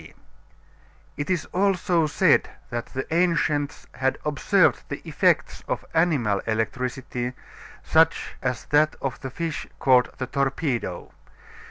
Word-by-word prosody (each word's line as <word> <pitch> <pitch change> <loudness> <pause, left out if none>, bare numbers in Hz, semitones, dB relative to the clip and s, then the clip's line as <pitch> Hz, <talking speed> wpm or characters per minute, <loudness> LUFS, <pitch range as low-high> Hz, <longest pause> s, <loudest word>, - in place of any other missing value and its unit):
D. - - -14 1.0
It 145 +3 -4
is 180 -4 0
also 180 -3 +2
said - - +3 0.2
that 120 0 -3
the 130 0 -4
ancients 165 -4 +1
had 130 +1 0
observed 150 -3 +3
the - - -4
effects - - +1
of - - -3
animal 145 - +2
electricity, 125 +2 -2 0.5
such 160 0 +3
as 125 -3 -2
that 150 +1 +4
of 135 -2 -3
the 130 - -4
fish 165 +4 -4
called 125 -2 +4
the 130 - -2
torpedo. 135 - -2
140 Hz, 125 wpm, -25 LUFS, 125-165 Hz, 1.0 s, that